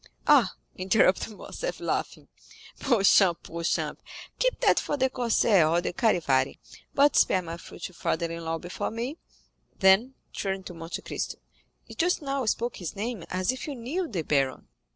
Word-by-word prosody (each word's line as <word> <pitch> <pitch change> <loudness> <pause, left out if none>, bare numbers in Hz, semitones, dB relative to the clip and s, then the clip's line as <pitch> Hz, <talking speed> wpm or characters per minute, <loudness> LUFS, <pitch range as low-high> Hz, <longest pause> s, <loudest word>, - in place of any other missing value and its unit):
"Ah," 270 -10 +5 0.2
interrupted 190 +2 +2
Morcerf, - - -5
laughing, - - -3 0.5
"Beauchamp, 195 -7 +4
Beauchamp, 170 0 -2 0.4
keep - - +1
that - - +4
for 290 - -2
the 260 -1 +1
Corsaire 225 -9 +3
or 170 +2 +3
the 175 - -3
Charivari, 150 - +2 0.4
but 285 +1 +5
spare 185 - +4
my 165 0 -6
future 170 +2 -9
father 170 0 -1
in 165 0 -6
law 165 0 -2
before 175 +3 -4
me." 240 +8 -5 0.6
Then, 195 +8 +4 0.2
turning 195 -1 -3
to 180 - -8
Monte 165 0 -6
Cristo, - - -4 0.5
"You - - -11
just 355 +2 +1
now 275 -2 -2
spoke 235 +2 -1
his 175 0 -6
name 215 -2 -4
as 185 +4 0
if 255 +3 -6
you 290 - -4
knew 290 +10 -3
the 185 - -3
baron?" 135 - 0
195 Hz, 160 wpm, -27 LUFS, 170-255 Hz, 0.6 s, Ah